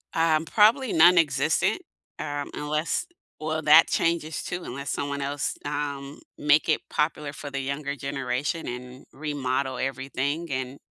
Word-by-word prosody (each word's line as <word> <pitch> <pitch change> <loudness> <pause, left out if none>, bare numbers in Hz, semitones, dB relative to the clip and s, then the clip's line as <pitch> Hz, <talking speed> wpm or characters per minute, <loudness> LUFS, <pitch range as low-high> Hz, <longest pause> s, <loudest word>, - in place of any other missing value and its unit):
Um, 160 -1 +3
probably 225 - +4
nonexistent, 170 - +4 0.4
um, 145 -1 -3
unless 150 - -1 0.3
well, 155 +1 -2
that 155 +2 +8
changes 165 -2 0
too, 175 0 -4
unless 140 +3 -6
someone 140 0 -2
else, 140 +1 -2
um, 145 -1 -4 0.2
make 150 +2 +3
it 155 - +3
popular 150 -1 -1
for 145 - -7
the 140 0 -3
younger 140 +1 -3
generation 140 +3 -3
and 125 +1 -7
remodel 135 -3 -2
everything 135 +4 -2
and 130 +1 -3
145 Hz, 130 wpm, -26 LUFS, 140-160 Hz, 0.4 s, that